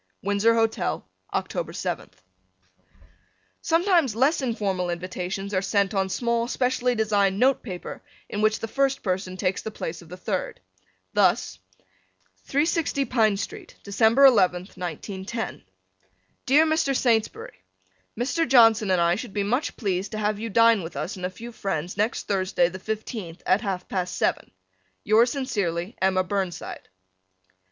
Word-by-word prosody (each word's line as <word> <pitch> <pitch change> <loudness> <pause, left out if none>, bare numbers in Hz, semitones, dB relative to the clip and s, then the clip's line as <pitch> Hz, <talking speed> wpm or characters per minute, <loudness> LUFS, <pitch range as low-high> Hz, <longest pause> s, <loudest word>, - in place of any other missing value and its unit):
Windsor 205 +3 +3
Hotel, 225 -1 0 0.2
October - - -3
7th, - - -5 1.4
Sometimes 335 - +2
less 275 +7 +2
informal 200 -7 -1
invitations 185 +3 -4
are 185 - +2
sent 200 +1 +1
on 190 -1 0
small 235 +2 0
specially 250 -1 0
designed 205 -3 +2
note 255 +3 +3
paper 185 -6 -7 0.3
in 205 - -3
which 215 0 +2
the 225 - -3
first 275 +3 0
person 185 -1 -2
takes 185 0 -1
the - - -5
place 170 -5 -6
of 170 - -15
the 180 - -8
third. - - -3 0.5
Thus - - +2 0.9
360 290 -1 +1
Pine 220 -4 +2
St., 395 - -7
Dec. 200 - -8 0.2
11th, 200 -9 +4
1910. 190 +6 -5 0.9
Dear 295 +5 +6
Mr. 315 -4 +1
Saintsbury: 225 -3 0 0.6
Mr. 325 +7 0
Johnson 225 -4 +6
and 185 -1 +3
I 170 0 +3
should 215 +2 -5
be 205 - 0
much 245 +9 -1
pleased 195 -2 -2
to - - -3
have 210 -1 -1
you 225 +1 -4
dine 230 0 +5
with 165 -1 -8
us 155 +6 -3
and 180 -1 -3
a - - -7
few 230 +6 -9
friends 180 -6 -3
next 215 +3 -1
Thursday, 185 -3 +1
the 185 +1 -8
fifteenth, 215 -4 -5
at 185 +3 +3
half 190 -5 -3
past 180 -2 -3
seven. - - 0 0.5
Yours 230 +4 +4
sincerely, 200 - -2
Emma 190 0 +3
Burnside. 190 -2 -4
210 Hz, 145 wpm, -25 LUFS, 185-245 Hz, 1.4 s, Dear